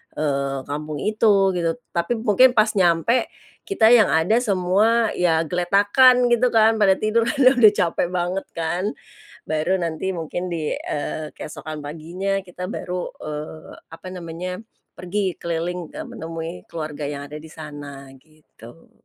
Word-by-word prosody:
eee, 140 -2 -1
kampung 150 +1 -5
itu 210 -3 +3
gitu. 170 -2 -1 0.2
Tapi 170 +7 -1
mungkin 245 +4 +5
pas 215 0 +4
nyampe 175 +7 +3 0.4
kita 310 - +4
yang 230 -4 +7
ada 160 +8 +3
semua 215 +2 +2
ya 165 -3 +2
geletakan 205 - +4
gitu 240 +1 +4
kan 225 0 +5
pada 195 -2 +5
tidur 225 +2 +2
karena 260 0 +4
udah 215 -3 +8
capek 175 -1 0
banget 180 +2 -1
kan. 170 +2 -2 0.6
Baru 155 +5 0
nanti 170 +1 -2
mungkin 175 +1 -4
di, 160 -3 -2
eee, 150 +1 -4
keesokan 155 0 -8
paginya 175 +6 -3
kita 180 0 -7
baru, 180 -2 -4 0.2
eee, 155 +1 -7 0.2
apa 175 - -10
namanya 180 0 -6 0.4
pergi 185 -1 -2
keliling, 170 +1 -3
eee, - - -5
menemui 165 0 -6 0.2
keluarga 155 -2 -5
yang 140 0 -6
ada 150 - -7
di 155 - -12
sana 145 -3 -9
gitu. 155 -2 -18
175 Hz, 140 wpm, -22 LUFS, 155-205 Hz, 0.6 s, udah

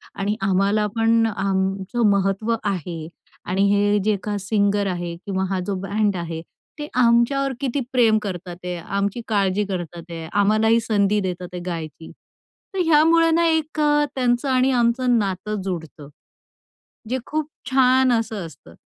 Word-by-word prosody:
आणि 205 +2 -1
आम्हाला 195 +2 +2
पण 225 0 +3
आमचं 195 +3 0
महत्त्व 200 +3 +1
आहे 175 -5 -3 0.4
आणि 190 +2 -1
हे 205 0 +2
जे 215 -1 +2
का 205 -1 -2
सिंगर 200 0 +1
आहे 175 -2 -3
किंवा 190 -1 -1
हा 190 -1 -1
जो 200 - -1
बँड 205 0 0
आहे 165 -1 -5 0.4
ते 295 - -4
आमच्यावर 250 +3 +3
किती 275 0 -1
प्रेम 230 -4 +4
करतात 180 -3 -5
आहेत, 175 -1 -4
आमची 200 +4 -1
काळजी 200 -1 +1
करतात 175 -3 -5
आहेत, 165 0 -6
आम्हालाही 215 +3 +3
संधी 210 -2 +1
देतात 180 -2 -4
आहेत 175 - -5
गायची." 160 -2 -6 0.6
तर 385 - -3
ह्यामुळं 325 +1 +4
ना 335 0 +3
एक 315 -1 0
अ, 295 0 +3
त्यांचं 250 +1 +1
आणि 260 +1 +3
आमचं 240 0 +2
नातं 200 +1 -3
जुडतं, 160 -6 -6 1.0
जे 260 +1 -1
खूप 310 0 -2 0.2
छान 260 -1 +4
असं 220 -5 -1
असतं. 85 - -15
205 Hz, 150 wpm, -22 LUFS, 190-240 Hz, 1.0 s, प्रेम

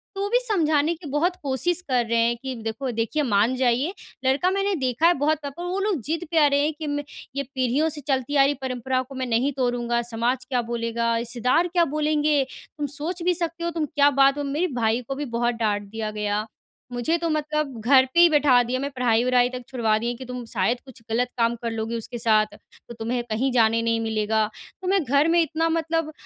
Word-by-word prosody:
तो 390 - -3
वो 405 - 0
भी 485 +3 +3
समझाने 325 -9 +1
की 320 -1 -11
बहुत 335 +6 +1
कोशिश 285 +6 0
कर 250 -3 +1
रहे 230 0 +1
हैं 235 +1 +2
कि 265 -1 -4
देखो 225 +4 -3
देखिए 230 +7 -1
मान 230 +1 +2
जाइए, 255 +7 +1 0.3
लड़का 270 +8 +3
मैंने 395 0 0
देखा 255 +6 +2
है 350 - +5
बहुत 300 +1 +1
पर 280 +5 -6
वो 360 +2 -2
लोग 395 -6 0
ज़िद 325 +8 -3
पे 330 - 0
अड़े 280 0 +3
हैं 305 +2 0
कि, 300 0 -6
"मैं 290 0 -2 0.3
ये 280 - -1
पीढ़ियों 265 +4 0
से 300 -1 -6
चलती 270 0 -1
आ 275 - +6
रही 285 - +2
परम्पराओं 255 0 -1
को 270 - -9
मैं 260 - -2
नहीं 245 +3 +1
तोड़ूँगा, 245 -2 0
समाज 240 +2 -2
क्या 250 -2 0
बोलेगा, 230 0 -1
रिश्तेदार 245 +8 +1
क्या 345 -1 +2
बोलेंगे, 300 -2 +2 0.3
तुम 290 -1 -2
सोच 340 +4 -4
भी 360 +1 +3
सकते 335 0 -3
हो 340 - 0
तुम 320 -2 -1
क्या 290 0 +3
बात 275 +1 +5
हो।" 290 - -2
मेरे 295 +6 0
भाई 225 +2 +2
को 270 - -3
भी 290 - -4
बहुत 240 0 +1
डाँट 210 -3 0
दिया 220 0 -4
गया। 210 0 -2 0.5
मुझे 245 +8 0
तो 335 0 -2
मतलब 305 -4 -2
घर 260 +2 +5
पे 340 - +3
ही 345 0 +8
बैठा 290 -5 +5
दिया, 250 +2 -2
मैं 280 +1 -2
पढ़ाई-वढ़ाई 245 0 +2
तक 255 0 -6
छुड़वा 230 -5 +1
दिए 235 +1 -2
कि 260 - -9
तुम 250 -1 -6
शायद 225 +3 0
कुछ 260 -4 -14
ग़लत 245 +2 +1
काम 230 0 +2
कर 230 - -1
लोगे 225 +1 -3
उसके 235 +2 -5
साथ 215 -2 +2
तो 235 - -16
तुम्हें 240 +2 -2
कहीं 240 +5 0
जाने 230 -2 +3
नहीं 230 0 +1
मिलेगा। 220 -1 0 0.3
तो 370 - -5
मैं 390 -2 +2
घर 280 +4 +3
में 340 - +5
इतना 325 +1 0
मतलब 325 -1 -1
260 Hz, 225 wpm, -24 LUFS, 235-305 Hz, 0.5 s, ही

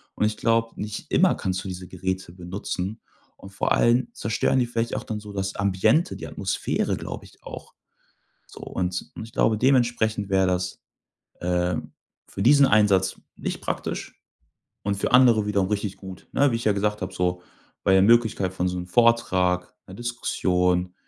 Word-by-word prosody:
und - - +1
ich 105 0 0
glaube, 115 0 +1
nicht 105 0 -6
immer - - +4
kannst 95 -1 -3
du - - -7
diese 90 -1 -6
Geräte 95 -1 -4
benutzen 95 +3 -5 0.4
und 95 - -12
vor 100 - -1
allem 120 +1 +3
zerstören 115 +4 0
die 125 - +3
vielleicht 115 -1 -2
auch - - -3
dann 110 -1 -4
so 105 0 -10
das 95 -1 -3
Ambiente, 100 - +2
die - - -7
Atmosphäre, 95 -3 -1
glaube - - -7
ich - - -20
auch. - - -10 0.7
So - - -13
und 90 -1 -2
ich - - -6
ich 115 - -11
glaube, 115 -3 +2
dementsprechend 120 -4 +2
wäre 95 -1 +3
das, 90 0 -2 0.6
äh, 90 0 0 0.5
für - - -6
diesen 140 +4 +6
Einsatz 100 -4 +3 0.2
nicht - - -4
praktisch - - -4 0.6
und 100 0 0
für 100 - -2
andere 120 -4 +6
wiederum 100 -2 +1
richtig 105 -1 -2
gut, 95 -2 -11
ne? 140 -1 +3
Wie - - 0
ich 115 - -3
ja 105 - +4
gesagt 105 +1 -1
hab 95 0 -4
so, 90 0 -1 0.4
bei 95 - +4
der 95 - +6
Möglichkeit 110 -3 +3
von 90 0 -1
so 90 0 -2
'nem 90 0 -5
Vortrag, 90 -5 +2
'ner 95 - -12
Diskussion, 90 -6 0
100 Hz, 175 wpm, -24 LUFS, 90-115 Hz, 0.7 s, diesen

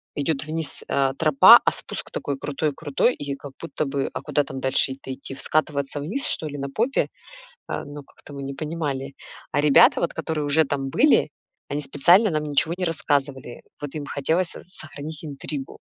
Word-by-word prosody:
идёт 145 0 -1
вниз, 160 -1 -4
э, 135 -1 +2
тропа, 155 -4 +8
а - - +4
спуск - - -6
такой 140 -1 -3
крутой 145 +2 -2
крутой, 150 - +1
и 140 -1 -4
как 140 0 -10
будто 165 -2 -3
бы, 135 0 -2
а - - -4
куда 145 -1 +1
там 135 -1 -7
дальше-то 135 0 0
идти? 135 +1 -7
В - - -12
скатываться 145 -2 -1
вниз 200 - -2
что - - 0
ли 145 -1 -6
на 140 0 -3
попе? 245 +5 +1 0.6
А, - - -4
ну, 145 0 -9
как-то 145 - -16
мы 140 -1 -7
не 135 0 -5
понимали. 145 -3 -3 0.4
А 145 - +2
ребята, 150 -2 +6
вот 170 - 0
которые 160 -1 -2
уже 155 +3 +4
там 135 -1 -2
были, 280 - +4 0.4
они 145 - -1
специально 170 +9 +4
нам 155 -1 0
ничего 150 +3 +1
не 185 - -1
рассказывали. 140 -6 -1 0.2
Вот 145 0 -6
им 150 - -4
хотелось 160 +6 0
со - - -9
сохранить 155 -3 -6
интригу. 140 -1 -6
145 Hz, 190 wpm, -24 LUFS, 140-160 Hz, 0.6 s, тропа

